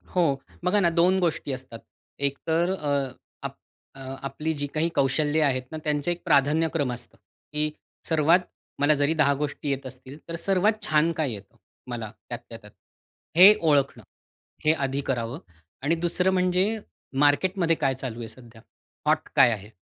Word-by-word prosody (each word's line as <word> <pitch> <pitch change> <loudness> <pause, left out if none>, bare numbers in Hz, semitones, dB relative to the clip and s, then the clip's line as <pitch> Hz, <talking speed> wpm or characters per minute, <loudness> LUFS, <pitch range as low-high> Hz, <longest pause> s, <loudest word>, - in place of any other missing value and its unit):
हो, 180 - +4 0.4
बघा 205 +3 +3
ना 175 -3 +4
दोन 180 +3 +3
गोष्टी 165 -5 -1
असतात. 130 -3 -7 0.4
एकतर 160 +5 0
अ, 140 -6 -1 0.3
आप - - -5 0.4
अ, - - -12 0.3
आपली 150 +4 -3
जी 145 -1 -3
काही 160 +2 +1
कौशल्य 145 +3 +2
आहेत 130 -3 +1
ना, 155 - -4
त्यांचं 150 +2 0
एक 175 - -4
प्राधान्यक्रम 150 -1 +2
असतं, 120 - -8 0.3
की 150 0 0 0.4
सर्वात 160 +2 +4 0.4
मला 145 +2 +4
जरी 145 +2 +3
10 150 -3 +3
गोष्टी 150 0 -3
येत 135 -1 -2
असतील, 130 +2 -9
तर 165 - -4
सर्वात 195 +5 +1
छान 155 +2 +3
काय 150 -6 0
येतं 100 -1 -11 0.3
मला, 115 -3 -5 0.2
त्यातल्या - - -7
त्यात? - - -14 0.7
हे 195 +4 +10
ओळखणं, 145 -4 +2 0.6
हे 155 - +5
आधी 135 -2 -1
करावं. 120 0 -2 0.4
आणि 155 +4 +2
दुसरं 175 +3 +1
म्हणजे, 185 +4 +2 0.4
मार्केटमध्ये 165 +4 +3
काय 135 -4 +1
चालू 125 -3 -6
आहे 115 - -6
सध्या? 115 0 -14 0.5
हॉट - - +2
काय - - +7
आहे? 105 0 -6
150 Hz, 155 wpm, -26 LUFS, 135-170 Hz, 0.7 s, हे